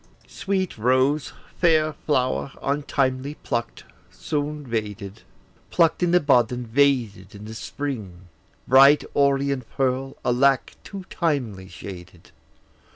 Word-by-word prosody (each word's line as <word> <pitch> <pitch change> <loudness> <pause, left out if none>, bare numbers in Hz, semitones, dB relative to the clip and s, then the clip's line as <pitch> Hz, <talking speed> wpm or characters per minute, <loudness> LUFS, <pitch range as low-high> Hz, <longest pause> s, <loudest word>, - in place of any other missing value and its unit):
Sweet 190 - -3
rose, 130 +5 +2 0.3
fair 155 -3 +3
flower, 135 -2 -1
untimely 140 -1 -1
pluck'd, 120 -5 -4 0.3
soon 150 -1 -4
vaded, 105 -3 -5 0.5
Pluck'd 165 0 +2
in 175 - +2
the 180 +1 +5
bud, 125 -7 +3
and 125 -1 -5
vaded 115 -7 +1
in 100 +1 -10
the 110 - -8
spring! 110 -8 -6 0.5
Bright 135 +3 +7
orient 140 -3 +1
pearl, 135 0 -1
alack, 130 +2 +2
too 195 -2 -8
timely 125 - -2
shaded! 90 0 -11
135 Hz, 110 wpm, -23 LUFS, 115-145 Hz, 0.5 s, Bright